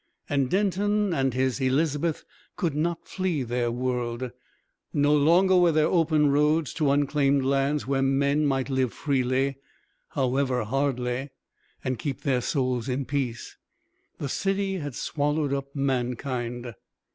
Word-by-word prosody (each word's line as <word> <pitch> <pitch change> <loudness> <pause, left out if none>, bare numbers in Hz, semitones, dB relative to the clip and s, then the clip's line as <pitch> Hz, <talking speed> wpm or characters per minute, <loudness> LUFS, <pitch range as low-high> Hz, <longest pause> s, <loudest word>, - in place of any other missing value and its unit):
And 140 -3 +1
Denton 205 0 +1
and 135 -4 0
his 130 +1 0
Elizabeth 145 +4 0 0.3
could 165 -4 -1
not 165 +3 -2
flee 185 -7 -1
their 120 0 -1
world, 125 0 -2 0.6
no 145 +1 +3
longer 175 +6 +4
were 175 -2 +5
there 155 -1 +3
open 155 -4 +3
roads 150 +1 +2
to 150 -3 +1
unclaimed 140 -1 +2
lands 140 +2 +1
where 135 0 0
men 140 +2 +2
might 135 0 -1
live 130 -3 0
freely 135 -1 0 0.6
however 130 -2 +1
hardly 130 +1 -1 0.5
and 130 -3 -2
keep 140 0 -4
their 130 -3 +1
souls 130 -2 -1
in 130 +2 -1
peace. 130 -5 -3 0.6
The 140 - -4
city 195 +3 -1
had 145 -5 -5
swallowed 145 -1 -1
up 140 0 -2
mankind. 125 -2 -2
140 Hz, 135 wpm, -26 LUFS, 130-150 Hz, 0.6 s, were